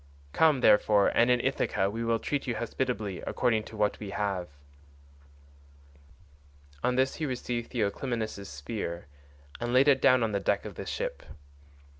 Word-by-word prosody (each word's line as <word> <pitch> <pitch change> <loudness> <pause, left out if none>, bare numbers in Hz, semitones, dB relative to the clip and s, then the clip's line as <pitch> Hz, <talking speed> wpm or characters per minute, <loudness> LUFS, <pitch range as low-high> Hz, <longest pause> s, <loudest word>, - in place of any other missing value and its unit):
Come, 155 -5 +4
therefore, 105 -2 +5
and 120 +1 +3
in 125 0 +4
Ithaca 95 - 0
we 115 +3 -3
will 115 0 +1
treat 140 +4 -3
you 120 - -1
hospitably 110 -4 -3
according 115 -4 +1
to 110 - -10
what 105 -1 0
we 105 - -6
have." 100 -3 -2 2.3
On 125 - +1
this 130 +1 +1
he 155 - -2
received 120 -2 -3
Theoclymenus' 110 -2 -2
spear 85 +4 -5 0.5
and 120 0 -2
laid 130 +3 +5
it 135 -2 +5
down 130 -2 +5
on 110 - 0
the 100 - 0
deck - - 0
of - - -6
the - - -8
ship. - - -3
115 Hz, 155 wpm, -29 LUFS, 105-125 Hz, 2.3 s, therefore